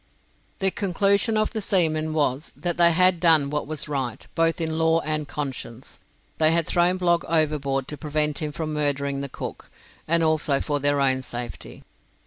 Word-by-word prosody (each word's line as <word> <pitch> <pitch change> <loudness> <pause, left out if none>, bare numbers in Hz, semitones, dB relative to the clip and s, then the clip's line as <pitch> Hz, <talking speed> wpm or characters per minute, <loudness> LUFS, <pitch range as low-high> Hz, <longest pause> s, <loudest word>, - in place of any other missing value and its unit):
The 190 0 +1
conclusion 200 +3 +1
of 215 0 0
the 220 - -2
seamen 160 -5 +1
was, 145 -1 0
that 170 +5 -3
they 170 -1 +6
had 180 +1 +4
done 160 -5 +4
what 150 -1 -2
was 155 -1 -2
right, 135 -5 -3
both 165 0 +1
in 160 -1 -2
law 160 0 +3
and 155 -1 -1
conscience. 135 -4 -6 0.4
They 155 0 +4
had 170 -1 +1
thrown 175 +3 +2
Blogg 175 -2 +1
overboard 145 -4 0
to 150 - -5
prevent 150 -1 0
him 150 -2 -3
from 155 0 -4
murdering 140 -2 -1
the 140 - -4
cook, - - -8 0.4
and 170 +1 +2
also 155 -3 +1
for 145 -1 -2
their 145 0 +1
own 130 -1 +2
safety. 120 -2 -8
155 Hz, 175 wpm, -24 LUFS, 145-170 Hz, 0.4 s, they